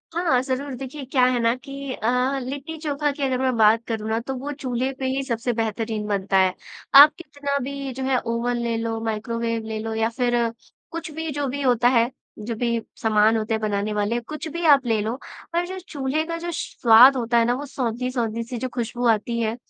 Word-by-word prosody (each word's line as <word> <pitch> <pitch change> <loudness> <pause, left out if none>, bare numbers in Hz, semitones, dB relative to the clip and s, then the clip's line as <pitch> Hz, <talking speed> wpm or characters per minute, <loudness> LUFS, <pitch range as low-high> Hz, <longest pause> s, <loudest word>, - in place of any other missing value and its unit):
हाँ, 330 -8 +2
ज़रूर 265 +1 -3
देखिए 270 +3 -7
क्या 255 -1 +2
है 250 -1 +2
ना 230 0 +3
कि 275 0 -7
अ, 250 +4 0
लिट्टी 275 +5 -6
चोखा 295 -1 -1
की 280 0 -5
अगर 260 -2 0
मैं 260 -2 +1
बात 220 +1 +5
करूँ 220 -2 -3
ना 220 +1 +1
तो 265 +3 -5
वो 285 +3 -5
चूल्हे 260 -2 -2
पे 265 - -2
ही 265 +1 -1
सबसे 240 -1 -2
बेहतरीन 220 -1 -2
बनता 195 -1 0
है। 185 -1 +4 0.4
आप 290 +2 +10
कितना 285 -4 -3
भी 275 0 -5
जो 265 - -5
है 260 -1 +2
ओवन 235 +1 -1
ले 235 -1 -1
लो, 225 0 -2
माइक्रोवेव 230 +1 -2
ले 220 -1 -3
लो 225 0 -4
या 225 0 +1
फिर 245 0 -1 0.6
कुछ 330 -1 -6
भी 320 +1 -4
जो 285 0 -2
भी 280 +2 -3
होता 245 -2 +3
है, 240 0 +3 0.3
जो 225 +2 -4
भी 235 0 0 0.2
सामान 220 0 +4
होते 215 +1 -2
हैं 220 - -1
बनाने 210 0 -1
वाले 210 +3 0
कुछ 305 +6 -7
भी 335 +2 -4
आप 280 -4 +6
ले 225 -3 +1
लो, 220 +3 -2 0.4
पर 345 +1 +1
जो 375 0 -6
चूल्हे 310 -4 -2
का 335 0 -4
जो 345 +1 -4
स्वाद 245 -2 +6
होता 235 0 +1
है 230 - +4
ना 240 - +2
वो 285 - -5
सोंधी-सोंधी 240 -3 -2
सी 240 +1 -6
जो 255 +2 -3
खुशबू 240 0 -2
आती 230 +1 +1
है, 225 0 -1
245 Hz, 220 wpm, -23 LUFS, 225-275 Hz, 0.6 s, आप